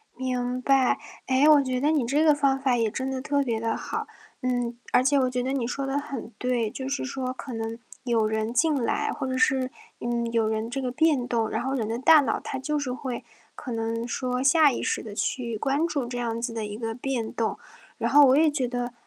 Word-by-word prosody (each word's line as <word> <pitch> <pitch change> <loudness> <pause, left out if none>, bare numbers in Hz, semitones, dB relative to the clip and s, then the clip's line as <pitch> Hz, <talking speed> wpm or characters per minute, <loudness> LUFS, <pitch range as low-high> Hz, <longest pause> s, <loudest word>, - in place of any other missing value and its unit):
明 250 0 -2
白。 265 -1 +3 0.3
诶， 265 +3 +4
我 295 -2 +7
觉 255 -2 -2
得 295 +2 +3
你 290 -6 +1
这 285 +6 +2
个 310 -1 +6
方 275 -2 +2
法 260 -3 +2
也 225 -2 +1
真 260 +4 -3
的 260 - -3
特 285 0 +1
别 230 -4 -1
地 225 0 -1
好。 - - -4 0.3
嗯， 245 -2 -1 0.2
而 250 - +5
且 280 +2 +3
我 255 -1 +2
觉 250 0 -1
得 260 - -1
你 270 -3 -1
说 275 +2 -3
得 270 +1 -1
很 270 -5 -6
对， 245 -3 0
就 265 +3 -6
是 275 +1 -2
说 260 -1 -3
可 260 0 -8
能 225 0 -4 0.3
有 230 -4 +2
人 220 +1 -1
进 310 +5 +3
来， - - 0
或 - - -4
者 260 0 -2
是， 260 0 +2 0.3
嗯， 235 -1 -2
有 225 -1 +2
人 220 +1 -2
这 270 +3 -3
个 255 -1 -2
变 285 -2 +2
动。 230 -3 0
然 - - -2
后 265 +1 -2
人 235 -6 -1
的 225 +1 -2
大 310 +4 +7
脑， 275 - -1
它 270 - -5
就 300 +3 -1
是 275 -3 -3
会， 250 -1 -5 0.3
可 255 - -7
能 230 0 -2
说 250 0 -2
下 290 +2 +5
意 245 - -3
识 - - -1
地 215 - -8
去 235 0 -2
关 280 +7 +1
注 285 -6 -2
这 245 0 -5
样 230 -1 -2
子 235 -1 -3
的 225 -2 -3
一 210 0 -6
个 225 -1 -3
变 245 -3 -3
动。 225 -1 -1 0.4
然 - - -1
后 290 0 +8
我 260 +1 +5
也 315 +1 +5
觉 270 -4 -1
得， 245 0 -3
255 Hz, 260 characters per minute, -26 LUFS, 235-275 Hz, 0.4 s, 后